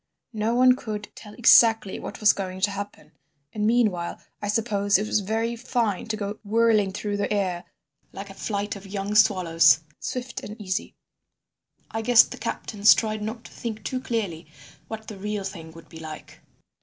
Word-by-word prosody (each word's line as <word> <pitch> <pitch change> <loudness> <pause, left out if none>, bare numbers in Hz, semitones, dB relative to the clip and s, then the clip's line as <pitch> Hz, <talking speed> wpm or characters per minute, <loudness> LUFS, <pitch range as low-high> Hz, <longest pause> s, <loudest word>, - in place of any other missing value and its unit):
No 220 +2 0
one 255 0 +6
could 210 -4 -6
tell 210 -1 -12
exactly 225 -4 +5
what - - -7
was 210 -1 +5
going 185 -1 -5
to 205 +1 +2
happen. 200 -6 -7 0.4
And 210 -1 0
meanwhile 215 -7 +1 0.2
I 205 - -3
suppose 205 -2 +2
it 210 - -2
was 215 - +1
very 225 +4 -1
fine 230 -5 -1
to 220 -1 -2
go 205 0 -5
whirling 215 -2 +3
through 205 +1 -3
the 205 - -2
air 185 -4 -1 0.5
like 195 0 -8
a - - -10
flight 205 +1 -3
of 200 0 -10
young 200 +1 -3
swallows, 170 -8 +5 0.2
swift 250 0 -5
and 210 +2 -9
easy. 190 0 -3 1.0
I 225 - -2
guess 240 +1 +7
the - - -9
captains 210 -1 +3
tried 215 -1 -2
not 220 +2 -5
to - - -13
think 220 -3 -6
too 255 - -2
clearly 205 -11 -3 0.4
what 220 -1 -7
the 205 -3 -8
real 210 0 -3
thing 165 -4 -7
would 165 0 -14
be 165 - -12
like. 155 -1 -10
210 Hz, 180 wpm, -25 LUFS, 195-225 Hz, 1.0 s, guess